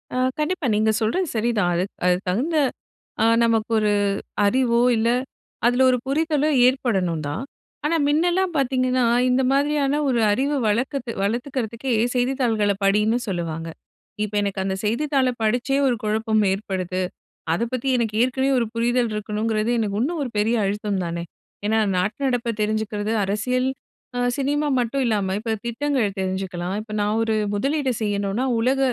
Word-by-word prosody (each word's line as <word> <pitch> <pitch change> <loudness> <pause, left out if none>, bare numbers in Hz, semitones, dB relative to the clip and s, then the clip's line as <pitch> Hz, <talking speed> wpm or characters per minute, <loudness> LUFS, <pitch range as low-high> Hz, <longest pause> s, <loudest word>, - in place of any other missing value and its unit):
அ - - -1 0.2
கண்டிப்பா 305 0 -1
நீங்க 220 +1 +3
சொல்றது 340 +12 0
சரிதான். 215 -5 +1
அது 175 - +1 0.2
அதுக்கு 180 +1 +2
தகுந்த 290 - 0 0.7
அ - - +4 0.2
நமக்கு 230 -1 +1
ஒரு 210 -1 +2 0.5
அறிவோ 235 +1 +2 0.2
இல்ல, 230 +1 +2 0.6
அதுல 245 +2 +4
ஒரு 250 - +3
புரிதலோ 305 +1 +1 0.2
ஏற்படணும் 190 - 0
தான். 165 - -3 0.4
ஆனா 330 +2 +2
முன்னலாம் 350 +4 +2
பாத்தீங்கன்னா 255 -1 +1 0.3
இந்த 255 +1 +3
மாதிரியான 285 0 +1
ஒரு 245 -3 +2
அறிவு 275 +6 +1
வளர்க்கத்து 245 +3 -1
வளர்த்துக்கிறதுக்கே 240 +2 -2 0.2
செய்தித்தாள்களை 245 -5 +1
படின்னு 210 +4 +3
சொல்லுவாங்க. 165 -3 -3 0.6
இப்ப 210 0 -5
எனக்கு 200 -1 -2
அந்த 190 0 -1
செய்தித்தாளை 265 +3 +1
படிச்சே 250 +5 +1
ஒரு 245 - +2
குழப்பம் 215 0 +1
ஏற்படுது. 185 -2 -2 0.5
அத 200 - 0
பத்தி 255 +2 -2
எனக்கு 220 -3 -1
ஏற்கனவே 265 +2 +1
ஒரு 230 - +1
புரிதல் 240 0 +1
இருக்கணுங்கிறது 215 +2 -1
எனக்கு 205 -2 -1
இன்னும் 320 +5 -1
ஒரு 250 - -4
பெரிய 220 +3 +2
அழுத்தம் 200 -1 -1
தானே. 170 0 -3 0.4
ஏன்னா 220 +1 +2 0.2
நாட்டு 195 +8 -1
நடப்பை 245 -2 0
தெரிஞ்சுக்கிறது, 215 0 -1
அரசியல் 250 +6 0 0.5
அ - - 0 0.2
சினிமா 290 +2 0
மட்டும் 255 +3 0
இல்லாம 200 -4 0
இப்ப 225 0 -2
திட்டங்கள் 235 -4 -1
தெரிஞ்சுக்கலாம். 185 -1 -3
இப்ப 215 - -12
நான் 210 +2 0
ஒரு 220 -1 0 0.2
முதலீடு 275 +4 0
செய்யணும்னா 205 +3 -1
உலக 260 +4 +1
230 Hz, 145 wpm, -23 LUFS, 205-265 Hz, 0.7 s, அ